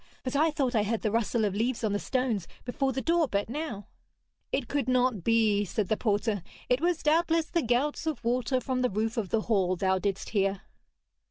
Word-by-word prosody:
But 255 +1 -3
I 310 +3 +4
thought 270 -4 -1
I 220 - +3
heard 215 +2 -1
the 215 - +1
rustle 230 0 +1
of 200 - -1
leaves 230 +4 -1
on 215 -2 +1
the 205 - 0
stones 245 -9 -1 0.2
before 265 +2 0
the 265 - -3
door 335 -2 +2
but 205 -2 -1
now.' 275 -9 -4 0.7
'It 265 -3 -1
could 275 -2 -1
not 250 -6 +2
be,' 220 -2 +3
said 200 0 -2
the 220 - +3
porter; 210 -2 0 0.3
'it 250 +3 +2
was 345 -1 0
doubtless 325 +1 +3
the 335 - +2
gouts 275 +6 0
of 295 -7 -2
water 250 +2 +1
from 255 0 -2
the 250 - +2
roof 220 +3 -1
of 210 -5 -2
the 225 - +1
hall 190 -5 +1
thou 190 +1 +1
didst 195 0 -2
hear.' 195 -2 0
235 Hz, 210 wpm, -28 LUFS, 205-265 Hz, 0.7 s, I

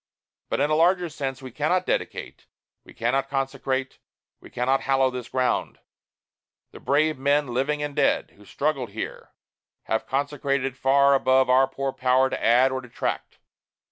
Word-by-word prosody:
But - - -1
in 150 - +1
a - - +3
larger 175 +2 +3
sense, 135 -3 -5
we 130 - -8
cannot 155 +8 0
dedicate, - - -4 0.4
we - - -16
cannot 135 +4 -1
consecrate, 135 -1 -2 0.4
we - - -14
cannot 130 +2 0
hallow 135 -1 +2
this 125 -2 -7
ground. 130 -1 -1 0.9
The - - -12
brave 155 +1 +1
men, 140 0 +1
living 140 +5 -1
and 145 -1 -4
dead, - - +1
who 105 - -19
struggled 140 -1 -2
here, 110 - -6 0.5
have 110 - -2
consecrated 140 0 -1
it - - -26
far 140 +1 +4
above 130 -1 +3
our 130 +1 +5
poor 135 0 -4
power 130 +1 +2
to - - -4
add 125 +3 +4
or 130 0 -3
detract. 125 -2 -4
135 Hz, 160 wpm, -24 LUFS, 130-145 Hz, 0.9 s, our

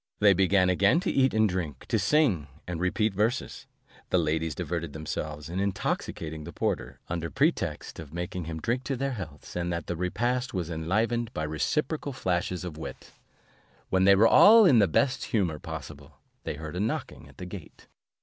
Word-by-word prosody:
They 105 -1 +6
began 95 0 +3
again 100 - +4
to 185 - -1
eat 135 -1 +3
and 110 0 +3
drink, 85 -8 -4
to - - +2
sing, 120 - +2 0.2
and 90 -2 -4
repeat 105 +3 +1
verses. 110 +6 -1 0.4
The - - +3
ladies 80 -1 0
diverted 85 -3 -3
themselves 75 -1 -5
in 90 +3 -4
intoxicating 80 -5 -2
the - - -8
porter, - - -3
under 85 -1 -3
pretext - - -1
of 75 -3 -9
making 90 +1 -4
him 80 0 -5
drink 120 +9 -1
their 135 0 -1
healths, 80 - -8
and 90 0 -1
the 85 0 -3
repast 120 - -1
was 85 -2 -2
enlivened 110 +9 0
by 80 - -2
reciprocal 140 - -1
flashes 90 -5 -1
of 80 -4 -7
wit. - - -8 0.8
When 95 0 +3
they 100 0 +7
were 110 +4 +6
all 220 - +8
in 130 -10 +6
the 100 - +5
best 130 - +1
humour 90 - 0
possible, 80 -5 -9 0.3
they - - -3
heard 80 +2 -7
a - - -2
knocking 105 +3 -3
at - - -19
the 90 - -7
gate. 90 -3 -10
90 Hz, 180 wpm, -28 LUFS, 80-115 Hz, 0.8 s, all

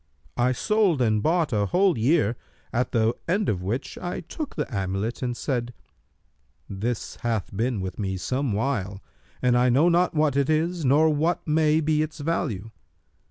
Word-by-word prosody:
I 125 +1 +3
sold 200 - +2
and 110 -4 +2
bought 160 0 +1
a 105 -1 +1
whole 185 - +3
year, 120 -1 +2 0.4
at 125 +1 0
the 115 -1 +2
end 200 +4 +1
of 90 -3 -1
which 115 +9 -4
I 175 0 -4
took 290 - -6
the - - -1
amulet[FN#291] 100 +1 -3
and 120 -2 -2
said, 120 -3 -2 0.9
'This 105 +4 -3
hath 110 -4 -2
been 115 0 -1
with 95 +1 -5
me 95 -2 -2
some 130 +6 -1
while, 100 -4 -1 0.4
and 125 -1 +4
I 125 +1 +4
know 145 +8 +4
not 175 0 +2
what 150 -2 +2
it 140 0 +1
is 165 +2 0
nor 150 +4 +4
what 160 +5 0
may 155 0 +3
be 155 0 +1
its 155 +1 -4
value.' 115 - -2
130 Hz, 170 wpm, -25 LUFS, 110-160 Hz, 0.9 s, and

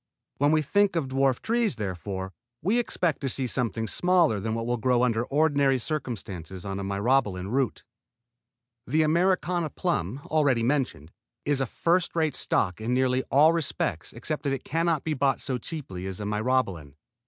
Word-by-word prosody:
When 145 +1 +3
we 155 0 +3
think 200 +5 +2
of 150 -6 -1
dwarf 135 -1 +2
trees, 230 - +1
therefore, 95 -2 -4 0.3
we 210 +8 +2
expect 180 -10 -1
to 135 - 0
see 130 +1 +1
something 115 -3 -1
smaller 175 - +2
than 110 +3 -2
what 115 0 -3
will 120 +1 0
grow 125 +1 +2
under 115 -2 +1
ordinary 140 -2 +2
circumstances 100 - -5
on 95 0 -3
a - - -4
Myrobalan 100 -1 0
root. 130 -3 0 1.0
The 155 +5 +3
Americana 175 0 +1
plum, 135 - -2
already 140 -6 +2
mentioned, 120 - -1 0.3
is 145 -2 +1
a 135 - 0
first 170 +8 0
rate 160 -3 +1
stock 90 -6 0
in 120 +3 0
nearly 130 0 +2
all 155 +4 +5
respects 135 - -2
except 150 +6 -4
that 140 -2 -1
it 135 - -4
can 165 +2 -1
not 160 -4 +1
be 160 - -1
bought 135 -1 +1
so 130 -3 -3
cheaply 100 - -6
as 95 -1 -5
the 105 - -5
Myrobalan. 105 - -1
130 Hz, 175 wpm, -26 LUFS, 105-155 Hz, 1.0 s, all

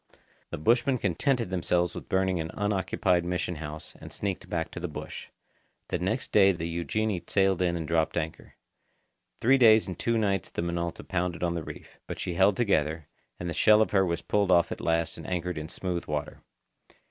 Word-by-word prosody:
The - - -5
bushmen 120 - +2
contented 115 - 0
themselves 90 -1 +1
with - - -8
burning 95 -2 +1
an 80 0 -3
unoccupied 95 -3 +1
mission 90 -1 -2
house, 75 0 -6
and - - -9
sneaked 100 -2 -4
back 80 -1 -2
to - - -6
the 90 - -3
bush. 75 - -7 0.6
The - - -1
next - - -2
day 100 -2 +6
the 85 -1 -4
Eugenie 90 +4 -1
sailed 95 -2 +2
in 90 -1 +1
and 80 -2 -4
dropped 80 0 +1
anchor. 80 -1 -4 0.9
Three 135 +4 +5
days 110 -3 +7
and 90 -3 -6
two 115 0 +1
nights 100 -5 0
the - - -3
Minota 85 0 -3
pounded 85 -1 -2
on 85 -1 +1
the 85 - -2
reef; - - -10
but - - -5
she 90 - -3
held 95 +3 +3
together, 80 -9 0 0.3
and 85 - -4
the 85 - -2
shell 105 +5 +5
of 110 - +2
her 95 -2 +4
was 85 -2 -2
pulled 100 -2 +1
off 85 -2 +4
at - - -5
last 85 0 0
and - - -8
anchored 90 -2 -2
in 75 0 -7
smooth 90 -2 -3
water. 75 -1 -4
90 Hz, 195 wpm, -28 LUFS, 85-100 Hz, 0.9 s, days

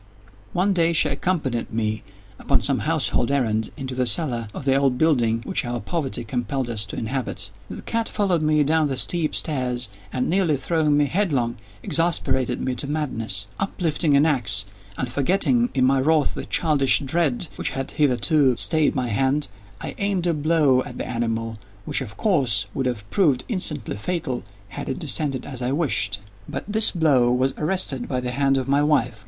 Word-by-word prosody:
One 190 +3 +2
day 170 -2 +3
she 155 -2 +3
accompanied 140 -5 -1
me, 110 -1 -1 0.4
upon - - +2
some - - +1
household 120 - +1
errand, 115 -6 0
into 130 -2 -5
the 125 -1 0
cellar 120 -2 0
of 135 - -8
the 135 -1 +3
old 135 -2 +2
building 120 -7 +2
which - - -1
our 120 0 -3
poverty 155 -6 -3
compelled 120 +2 -2
us 105 -3 -2
to - - -7
inhabit. 130 +3 -3 0.2
The - - -7
cat 230 0 -2
followed 190 -6 +1
me 155 -1 +3
down 155 +1 +2
the 135 -2 -3
steep 165 +3 +1
stairs, 125 -6 -1 0.2
and, 125 -1 -1
nearly 175 -5 +2
throwing 150 +1 +1
me 145 - +4
headlong, 140 - 0 0.3
exasperated 130 -7 +1
me 130 - -1
to 140 - -2
madness. 115 -10 -2
Uplifting 165 -5 0
an 145 - +4
axe, 115 -10 +2 0.3
and 130 - -2
forgetting, 195 - +2
in 130 -1 +3
my 135 +1 +3
wrath, 155 +2 +2
the - - -6
childish 150 -5 +3
dread 150 +1 0
which - - -1
had 135 0 -4
hitherto 135 -1 +2
stayed 155 -3 +3
my 125 -3 -1
hand, 135 +6 +1 0.3
I - - -4
aimed 200 -3 0
a 170 - +2
blow 150 -4 +3
at 125 -1 -8
the - - -4
animal 115 -2 -2 0.3
which, - - +1
of 105 -6 -8
course, 130 - +2
would 135 - -1
have 110 -5 -4
proved 145 -10 +2
instantly 150 - -2
fatal 130 - -3 0.3
had - - -6
it - - -2
descended 140 - 0
as 130 -3 -5
I 125 +1 -1
wished. 110 - 0 0.3
But - - -4
this 220 +1 +5
blow 140 -8 +3
was 130 +2 +1
arrested 150 -6 -1
by 130 - -1
the 125 0 -3
hand 135 +1 +2
of 130 - -2
my 140 +1 +3
wife. 125 -7 +1
135 Hz, 180 wpm, -23 LUFS, 125-160 Hz, 0.4 s, this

